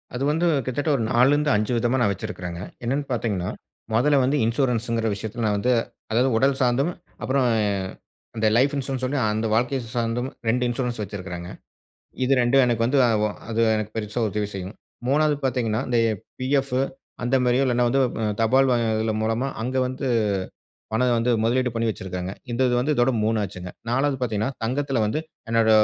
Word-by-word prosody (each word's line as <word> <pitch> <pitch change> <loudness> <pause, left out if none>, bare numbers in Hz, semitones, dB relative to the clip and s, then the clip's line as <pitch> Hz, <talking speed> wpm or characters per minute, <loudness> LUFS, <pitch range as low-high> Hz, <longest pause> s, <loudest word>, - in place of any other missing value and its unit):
அது 130 - -2
வந்து 165 +3 +1 0.2
கிட்டத்தட்ட 135 +4 -1
ஒரு 115 - -1
4 120 +2 +5
லருந்து 150 +1 +2
5 105 +3 +1
விதமா 120 +3 +1
நான் 105 -4 +3
வச்சிருக்கேங்க. 90 -4 -5 0.2
என்னானு 135 +5 0
பாத்தீங்கன்னா, 105 -7 -1 0.4
மொதல 140 +5 +4
வந்து 140 +3 +2
இன்சூரன்ஸ்ன்குற 115 -2 0
விஷயத்துல 110 +3 -5
நான் 105 -1 +2
வந்து 125 +5 +1 0.4
அதாவது 125 +4 +3
உடல் 135 +3 +3
சார்ந்தும், 130 +6 +2 0.3
அப்புறம் 130 0 +1 0.9
அந்த 110 - +1
லைஃப் 140 +4 +3
இன்சூரன்ஸ் 135 -1 -2
சொல்லி 140 +3 -1
அந்த 110 +1 -1
வாழ்க்கைய 125 +4 +1 0.2
சார்ந்தும் 120 +2 -1 0.2
2 125 +2 +2
இன்சூரன்ஸ் 120 -1 -2
வச்சிருக்கேங்க. 90 -3 -6 0.7
இது 125 - +1
2ம் 125 +2 +4
எனக்கு 120 -2 +1
வந்து 135 +3 +2 0.5
அது 115 - -2 0.2
எனக்கு 110 0 -3
பெரிசா 110 +2 -2
உதவி 105 +1 -2
செய்யும். 95 +2 -6 0.3
மூணாவது 150 +2 +3
பாத்தீங்கன்னா, 120 -4 0
இந்த 120 - +2 0.4
பிஎஃப் 135 0 +1 0.5
அந்த 125 +2 +1
மாதிரியோ 125 +2 +3
இல்லன்னா, 125 -1 +2
வந்து 135 +3 +2 0.4
தபால் 130 +4 +4 0.5
மூலமா 115 +4 0 0.2
அங்கு 130 +2 0
வந்து 130 +1 -4 0.9
பணம் 120 +2 +2
வந்து 115 +2 +1
முதலீடு 125 +2 +2
பண்ணி 115 0 0
வச்சுருக்காங்க. 95 -3 -4 0.2
இந்த 120 +2 -1
இது 125 - +1
வந்து 145 +5 +1
இதோட 120 +1 +3
மூணாச்சிங்க. 100 -5 -2 0.2
நாலாவது 135 +3 +1
பாத்தீங்கன்னா, 110 0 -1
தங்கத்துல 135 +2 0
வந்து 110 +8 -1 0.3
என்னோட 115 -1 +3
120 Hz, 160 wpm, -24 LUFS, 110-130 Hz, 0.9 s, 4